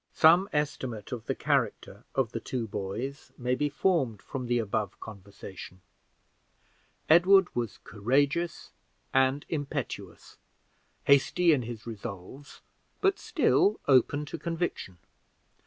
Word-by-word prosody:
Some 175 +5 +6
estimate 130 -7 -3
of 115 -3 -6
the - - -1
character - - -1
of 130 -4 +1
the 115 - -3
two 115 0 -4
boys 110 +9 -5
may 125 0 -1
be 145 +3 0
formed 145 - +1
from 125 +2 -6
the 120 0 +2
above 110 -2 -2
conversation. 100 -3 -10 1.3
Edward 180 +3 +5
was 120 -4 -2
courageous 140 +11 0 0.4
and 135 +2 +2
impetuous 145 -4 -5 0.7
hasty 150 +5 +4
in 140 - +1
his 115 -2 -7
resolves, 115 +4 -9 0.4
but 395 -1 +2
still 390 +2 +2
open 145 +2 +3
to 160 +2 -7
conviction. 165 - -3
130 Hz, 115 wpm, -28 LUFS, 110-155 Hz, 1.3 s, Some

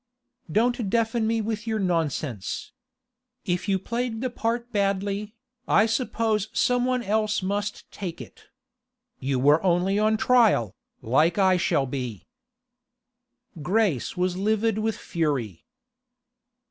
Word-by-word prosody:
'Don't 235 +1 +1
deafen 225 0 +1
me 225 0 +1
with 220 +1 -4
your 220 -1 0
nonsense! 160 - -2 0.7
If 180 +3 -1
you 195 - +3
played 235 +3 -3
the 255 -1 -2
part 235 0 -2
badly, 200 +1 -1 0.3
I 215 - +5
suppose 225 -2 0
some 245 -1 +2
one 255 -1 0
else 215 -1 0
must 205 +2 -2
take 175 -4 -6
it. - - -12 0.7
You 135 0 -1
were 145 +5 +4
only 185 +2 +2
on 215 +1 +3
trial, 220 - +3 0.3
like 155 - +2
I 190 -2 +4
shall 165 -6 +1
be.' 125 -4 -5 1.4
Grace 185 - 0
was 180 0 0
livid 215 +2 +1
with 220 0 -1
fury. 140 - -2
205 Hz, 120 wpm, -25 LUFS, 170-225 Hz, 1.4 s, I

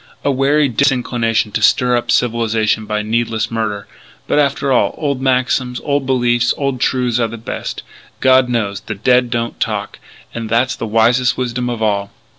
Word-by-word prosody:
A 140 - +2
wary 140 +2 +2
disinclination 120 -3 0
to - - -2
stir 125 -1 +3
up 120 - -2
civilization 110 -2 +1
by 105 0 -1
needless 115 +1 -1
murder. 105 -3 -3 0.4
But - - +1
after 140 -1 +1
all, 125 - +2
old 140 -4 -2
maxims, 125 -1 0
old 140 -2 -1
beliefs, 120 -2 +2
old 140 -3 -2
truths 125 -3 +1
are 115 - +1
the 115 +1 -8
best, 110 - -6 0.4
God 130 -1 +4
knows. 105 -5 -1
The 105 +1 -6
dead 125 +4 +2
don't 115 -1 -3
talk! - - -3 0.3
And 115 -1 -5
that's 120 +2 +1
the 115 - -5
wisest 115 +3 +2
wisdom 125 -1 -2
of 115 -2 -3
all. 100 -2 0
120 Hz, 170 wpm, -17 LUFS, 115-130 Hz, 0.4 s, God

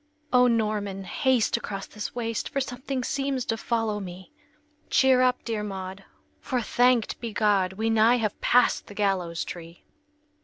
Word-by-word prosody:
"O 250 0 +6
Norman, 210 -4 -1
haste 255 +3 +1
across 195 -1 -5
this 210 +2 -7
waste 230 -2 -2
For 280 - -1
something 260 0 -3
seems 270 -1 -1
to 225 - 0
follow 225 -2 -1
me!" 185 -2 -9 0.6
"Cheer 260 -1 +4
up, 250 0 +2
dear 225 -2 -2
Maud, 195 -1 -6 0.3
for, 255 -3 -2
thanked 245 0 +2
be 230 -2 -4
God, 205 -4 +2
We 220 +3 -1
nigh 225 +2 +5
have 215 -3 -2
passed 250 - +3
the 205 - -11
gallows 185 -5 0
tree!" 170 -1 -9
220 Hz, 155 wpm, -26 LUFS, 195-250 Hz, 0.6 s, O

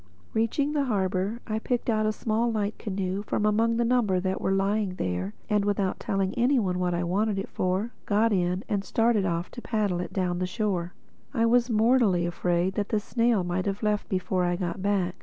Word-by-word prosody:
Reaching 230 +6 +1
the 290 -2 +1
harbor, 195 0 -1
I 215 -1 -2
picked 245 +1 -2
out 215 -2 +2
a - - +2
small 225 +2 0
light 215 -1 -2
canoe 190 -1 -2
from 210 0 -1
among 225 +2 +2
the 235 - +2
number 230 -6 +2
that 190 +1 -2
were - - 0
lying 195 0 +1
there 90 - -3
and 210 -1 +2
without 200 -2 0
telling 195 -1 -1
any 250 +3 +2
one 185 -6 0
what 180 -1 0
I 175 - -1
wanted 200 +4 0
it 195 - -3
for, 185 +5 -1 0.2
got 215 +2 +3
in 180 +1 0
and 200 -1 -1
started 225 -2 +2
off 170 0 -2
to 240 - -8
paddle 210 -7 0
it - - -5
down 180 -2 -1
the 185 - -1
shore. 185 -3 -2 0.4
I 230 -2 +3
was 240 +1 +3
mortally 220 -5 +3
afraid 175 +1 0
that 205 +1 -2
the 215 - +1
snail 230 -1 +1
might 180 +2 -2
have 200 +2 -3
left 210 -1 0
before 185 -1 0
I 175 0 +1
got 175 +1 -3
back. 190 -3 +1
200 Hz, 210 wpm, -27 LUFS, 185-225 Hz, 0.4 s, got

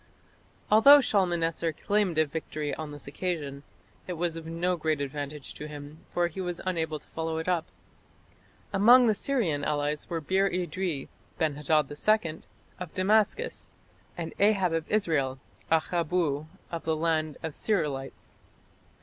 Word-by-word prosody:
Although 280 +7 +9
Shalmaneser 170 - +1
claimed 200 0 0
a 155 - +5
victory 150 -1 -4
on 155 -2 -5
this 145 -1 -9
occasion, 145 -3 -3 0.5
it 180 - -3
was 170 -1 -1
of 165 -1 -7
no 175 +2 0
great 155 -2 0
advantage 145 0 -5
to 150 - -7
him, 145 +1 -9
for 175 - +1
he 175 +3 -6
was 175 -1 -3
unable 160 -4 -1
to 150 - -19
follow 160 0 -3
it 160 - -4
up. 175 -3 +1 1.1
Among 240 +6 +7
the 220 - +4
Syrian 200 - 0
allies 150 0 -1
were 170 - -1
Bir 190 +5 +2
idri 180 -4 -2 0.3
(Ben 155 -2 +1
hadad 150 0 +1
II) 165 0 +1 0.4
of 180 -3 -6
Damascus, 215 - +1 0.5
and 165 -2 -4
Ahab 195 -4 +3
of 165 -1 -2
Israel 155 -11 +1 0.3
("Akhabbu 160 -2 +1 0.2
of 170 -1 -4
the 160 0 0
land 155 -2 0
of 160 - -2
the - - -11
Sir'ilites"). 145 -10 -2
165 Hz, 150 wpm, -28 LUFS, 150-185 Hz, 1.1 s, Although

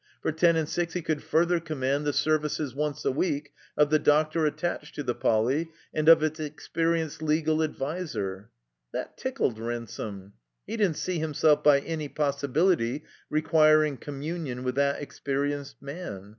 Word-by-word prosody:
For - - +1
ten 170 +2 +4
and 160 -2 0
six 170 +1 -2
he 180 - -2
could 155 -2 -1
further 170 +2 +2
command 145 -3 -1
the - - +3
services 150 -2 0
(once 150 0 -3
a - - +3
week) 145 0 -1 0.2
of 150 0 +4
the 155 - +5
doctor 155 +2 +3
attached 150 -1 -3
to 145 - -3
the 125 - 0
Poly, 125 +10 +1 0.2
and 155 +1 +3
of 165 -2 +8
its 155 0 -1
experi 165 +2 -1
enced 150 0 -10
legal 155 0 +1
adviser. 135 - -3 0.4
That - - -4
tickled 260 - -1
Ransome. 110 -4 -5 0.3
He 225 - -4
didn't 200 -9 +1
see 180 +1 -2
himself 155 -1 +2
by 140 -2 +6
any 155 -1 -4
possibility 140 -1 +1 0.3
requiring 155 -2 +4
commiuiion 145 -2 -5
with 125 0 -1
that 140 +1 +1
experienced 140 0 -3
man. 140 - -7
150 Hz, 155 wpm, -27 LUFS, 140-160 Hz, 0.4 s, of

